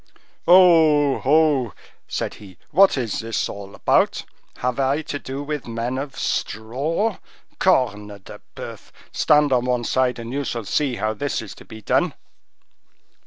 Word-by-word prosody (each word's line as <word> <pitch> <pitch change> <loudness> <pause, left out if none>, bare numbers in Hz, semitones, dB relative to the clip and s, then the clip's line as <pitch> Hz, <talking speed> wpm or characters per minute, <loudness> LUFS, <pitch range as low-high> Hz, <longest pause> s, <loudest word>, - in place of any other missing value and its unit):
"Oh! 160 -6 +6
oh!" 145 -4 +3 0.3
said - - -3
he, 95 -4 -13
"what 190 -1 +5
is 120 -4 -2
this 115 -1 -2
all 100 0 -9
about? - - +1 0.3
Have 125 +1 -2
I 140 +3 +1
to 145 - -5
do 135 +1 -6
with 150 -3 -5
men 120 +3 -3
of 135 -1 -6
straw? 145 - -2 0.4
Corne 125 - +2
de 100 -2 -12
boeuf! - - -9 0.2
stand 150 -2 +3
on 125 -1 +2
one 125 -1 0
side, 125 +1 +1
and 115 +1 -7
you 140 +1 -1
shall 115 -4 -4
see 140 +3 0
how 110 -1 -1
this 140 +6 -2
is 110 - -7
to - - -15
be 110 -1 -12
done." - - +1
130 Hz, 155 wpm, -22 LUFS, 115-150 Hz, 0.4 s, Oh